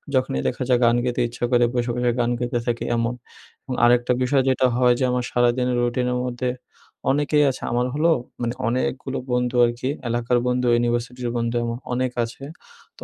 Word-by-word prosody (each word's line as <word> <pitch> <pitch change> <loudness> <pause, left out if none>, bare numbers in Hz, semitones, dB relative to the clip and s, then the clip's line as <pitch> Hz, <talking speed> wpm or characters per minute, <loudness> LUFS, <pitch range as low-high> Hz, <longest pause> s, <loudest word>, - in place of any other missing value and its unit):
যখনই 130 - 0
দেখা - - -2
যায় 125 -1 +4
গান 120 0 +4
গেতে 125 0 -1
ইচ্ছা 120 - -9
করে 120 -1 +4
বসে, 120 -1 -1
বসে 125 0 +1
গান 120 0 +2
গেতে 120 0 -1
থাকি 120 -1 -1
এমন 115 +1 0 0.5
এবং 130 - -4
আরেকটা 120 +1 +3
বিষয় 135 +1 +2
যেটা 130 0 +3
হয় 125 -1 +4
যে - - 0
আমার 125 0 0
সারাদিনের 120 +1 +2
রুটিনের 125 +1 0
মধ্যে 125 0 -2 0.6
অনেকেই 150 +1 +2
আছে। - - -10
আমার 120 +1 +1
হলো 155 +4 +2 0.3
মানে 120 0 -1
অনেকগুলো 130 +2 -2
বন্ধু 125 0 0
আরকি 120 +2 -2 0.2
এলাকার 120 +1 +1
বন্ধু, 125 0 +1
ইউনিভার্সিটির 120 +1 -1
বন্ধু 115 0 -1
আমার 115 +1 -3
অনেক 130 0 0
আছে। 115 +4 -8 0.5
তো - - -11
125 Hz, 180 wpm, -23 LUFS, 120-125 Hz, 0.6 s, যায়